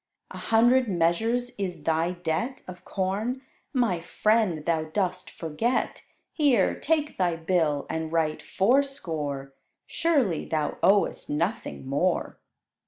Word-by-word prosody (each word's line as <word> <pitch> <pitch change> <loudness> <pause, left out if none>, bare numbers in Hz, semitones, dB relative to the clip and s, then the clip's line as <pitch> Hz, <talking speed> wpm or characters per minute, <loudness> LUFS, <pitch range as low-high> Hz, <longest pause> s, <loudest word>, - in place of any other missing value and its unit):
"A - - -7
hundred 240 +3 +4
measures 220 +8 +1
is 185 -3 -3
thy 165 +2 +1
debt 175 +9 -3
Of 180 -1 -10
corn? 210 +7 -2 0.3
My 235 - +1
friend, 205 -4 +1
thou 160 -2 +1
dost 185 +2 -2
forget: 165 +10 -2 0.3
Here, 270 - +3
take 305 -5 -1
thy 175 -2 +2
bill, 160 -4 0
and 160 0 -3
write 160 -2 0
fourscore; 165 - 0 0.3
Surely 270 - +1
thou 155 -2 -2
owest 200 +1 +2
nothing 165 0 -2
more." 145 +7 0
185 Hz, 115 wpm, -26 LUFS, 160-235 Hz, 0.3 s, hundred